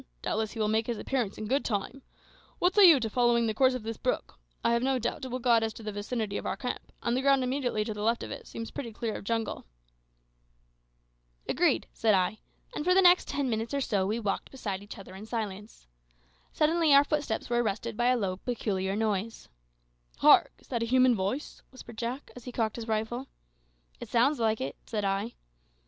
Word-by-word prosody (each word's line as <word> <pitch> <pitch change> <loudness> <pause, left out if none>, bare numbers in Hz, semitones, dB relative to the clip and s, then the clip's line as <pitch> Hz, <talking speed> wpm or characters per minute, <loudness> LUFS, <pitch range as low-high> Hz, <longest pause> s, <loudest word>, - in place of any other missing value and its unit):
Doubtless 220 0 -1
he 230 - -7
will 215 - +2
make 220 +1 +1
his 235 -2 -2
appearance 240 -6 -2
in 215 - -5
good 270 +6 +1
time. 220 +5 -3 0.6
What 360 +1 +2
say 395 -3 +9
you 305 -5 +7
to 225 - -1
following 235 +1 +2
the 220 - 0
course 260 +3 +3
of 250 - -5
this 225 0 -5
brook? - - -3 0.2
I 235 - +3
have 235 - +2
no 265 +1 +1
doubt 240 - -3
it - - -3
will 255 0 -3
guide 235 -2 +3
us 220 -1 -2
to 225 - -11
the 215 - -4
vicinity 205 0 -3
of - - -6
our - - -2
camp, 250 - -5
and 235 0 +1
the 260 - +1
ground 275 -1 +4
immediately 250 -4 -1
to 215 - -3
the 210 - -6
left 230 +2 +1
of - - -7
it - - -8
seems 230 0 -7
pretty 235 -5 -6
clear 220 0 -3
of - - -6
jungle." 225 +1 -2 1.8
"Agreed," - - +2
said 220 -2 +3
I; 185 +3 0 0.3
and 300 - -3
for 365 +3 +3
the 385 - +6
next 360 0 +6
ten 280 -2 -1
minutes 230 +2 -2
or - - +1
so 200 -8 0
we 220 +3 -1
walked 205 -3 -2
beside 200 -8 -4
each 205 +2 -10
other 195 -2 -11
in 200 +3 -9
silence. 210 - -5 0.7
Suddenly 315 -1 +3
our 280 - +8
footsteps 290 -6 -2
were 240 0 +1
arrested 220 +1 -2
by 240 +2 +1
a 250 0 +4
low 190 -4 -2
peculiar 195 -4 -2
noise. 215 - -2 0.7
"Hark! - - +6
is - - -23
that 235 -2 -1
a 230 - -1
human 255 +1 +5
voice?" 205 +9 -3
whispered 235 -4 -11
Jack, 245 +4 -4
as 250 - -11
he 250 - -6
cocked 225 -2 -1
his 230 -1 -6
rifle. 225 +4 -2 0.7
"It - - -8
sounds 255 +5 +3
like 220 -1 +1
it," 135 +1 -4
said 210 -3 -3
I. 195 +4 -1
230 Hz, 220 wpm, -29 LUFS, 215-255 Hz, 1.8 s, say